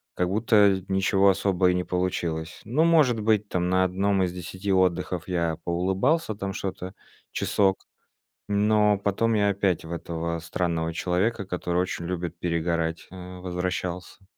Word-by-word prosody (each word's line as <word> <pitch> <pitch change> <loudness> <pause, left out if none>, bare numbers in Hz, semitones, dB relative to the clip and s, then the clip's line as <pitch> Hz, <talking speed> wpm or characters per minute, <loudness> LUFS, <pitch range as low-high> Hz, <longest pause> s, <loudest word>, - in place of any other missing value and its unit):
как 90 - 0
будто 100 -2 +3
ничего 95 +1 +3
особо 95 -1 +2
и - - 0
не 90 - 0
получилось. 90 -3 -2
Ну, 130 +9 +2
может 155 -9 +4
быть, 105 -1 +2
там 90 0 -1
на 95 0 +3
1 95 +1 +1
из 90 - -1
10 90 +2 -5
отдыхов 90 -1 0
я 85 -3 -1
поулыбался 95 - 0
там 100 -1 -4
что-то 95 0 -5 0.4
часок, 95 -2 +1 0.6
но 105 0 +3
потом 105 +3 0
я 105 -1 +3
опять 95 -4 0
в 80 - -7
этого 85 0 -3
странного 85 -1 -2
человека, 95 +6 0
который 90 -1 -1
очень 85 -2 -4
любит 85 -2 -4
перегорать, 85 -1 -1
а, 90 0 -9
возвращался. 90 +1 -4
95 Hz, 145 wpm, -25 LUFS, 90-100 Hz, 0.6 s, может